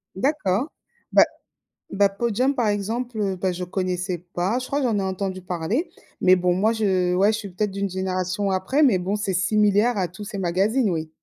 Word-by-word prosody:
D'accord. 240 -1 0 0.4
Bah, - - +7 0.7
bah, 200 0 +3
Podium 235 +6 0
par 240 -5 0
exemple, 210 0 -1
bah, 185 +1 0
je 180 +1 -5
connaissais 180 -1 -2
pas. 190 +8 0
Je 255 - -6
crois 285 +1 -1
que 260 - +1
j'en 215 -3 +1
ai - - 0
entendu 190 0 -3
parler, 185 - -2 0.3
mais 185 0 +6
bon 180 0 +1
moi 210 +5 +2
je 185 -5 +1
ouais, 200 +3 +4
je 210 - -1
suis 205 -3 -7
peut-être 195 +3 -2
d'une 200 0 -2
génération 185 +1 -2
après, 190 +11 +1
mais 240 -10 +5
bon, 190 +3 -1
c'est 205 -2 -2
similaire 210 +4 +2
à 185 - 0
tous 180 +5 -10
ces 205 -1 -6
magazines 195 +7 +1
oui. 160 -3 -2
195 Hz, 200 wpm, -23 LUFS, 185-220 Hz, 0.7 s, Bah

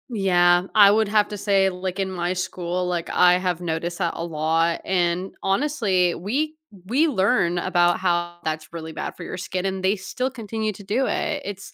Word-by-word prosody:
Yeah, 175 -3 +4
I 205 -2 +8
would 220 +1 +2
have 210 0 +2
to 210 - -5
say, 195 -1 +3
like, 185 +1 -5
in 190 -1 -1
my 175 -1 -2
school, 180 -1 -3
like, 175 -2 -2
I 180 0 +4
have 180 -2 -2
noticed 170 0 -3
that 170 -3 -1
a 165 - -4
lot, 165 +1 0
and 180 0 0
honestly, 195 - +1
we 275 - -2 0.3
we 270 - +2
learn 195 - +2
about 175 -1 +2
how 175 -2 0
that's 155 0 -3
really 160 -1 -6
bad - - -5
for - - -8
your - - -6
skin, 185 0 -4
and 190 -1 -2
they 190 +2 +3
still 215 +6 -3
continue 220 -3 -4
to 200 +1 -12
do 225 +7 0
it, 295 -1 -1
it's 195 0 -7
185 Hz, 195 wpm, -23 LUFS, 175-205 Hz, 0.3 s, I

